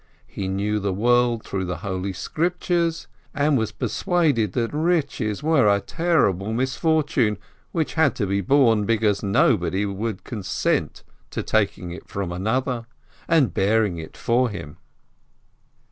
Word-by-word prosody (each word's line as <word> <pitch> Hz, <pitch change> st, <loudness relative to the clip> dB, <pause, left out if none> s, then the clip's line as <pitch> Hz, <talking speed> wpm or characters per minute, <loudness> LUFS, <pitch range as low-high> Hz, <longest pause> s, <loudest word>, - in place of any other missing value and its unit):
He 95 Hz, -, -5 dB
knew 100 Hz, +3 st, -1 dB
the 100 Hz, -2 st, -2 dB
world 120 Hz, +1 st, +2 dB
through 95 Hz, -1 st, -3 dB
the 90 Hz, 0 st, -3 dB
Holy 95 Hz, 0 st, -2 dB
Scriptures, 170 Hz, -, -1 dB, 0.3 s
and 145 Hz, +1 st, +2 dB
was 110 Hz, -4 st, 0 dB
persuaded 150 Hz, -, 0 dB
that 115 Hz, 0 st, -1 dB
riches 150 Hz, -, 0 dB
were 155 Hz, -7 st, +4 dB
a 100 Hz, 0 st, +4 dB
terrible 110 Hz, -, 0 dB
misfortune, 130 Hz, -, +1 dB, 0.3 s
which 160 Hz, -3 st, -1 dB
had 160 Hz, -4 st, +3 dB
to 105 Hz, -, -1 dB
be 100 Hz, +1 st, 0 dB
borne, 115 Hz, -2 st, +3 dB
because 110 Hz, -3 st, +2 dB
no 100 Hz, -1 st, +3 dB
one 100 Hz, 0 st, -2 dB
would 110 Hz, -3 st, -3 dB
consent 105 Hz, -6 st, -2 dB, 0.3 s
to -, -, -4 dB
taking 90 Hz, -, 0 dB
it 85 Hz, -, -9 dB
from 100 Hz, -3 st, -3 dB
another, 115 Hz, +6 st, -1 dB, 0.4 s
and 145 Hz, -, +3 dB
bearing 100 Hz, -2 st, +1 dB
it 80 Hz, -, -9 dB
for 120 Hz, +1 st, +1 dB
him. 75 Hz, -7 st, -8 dB
110 Hz, 140 wpm, -23 LUFS, 100-145 Hz, 0.4 s, were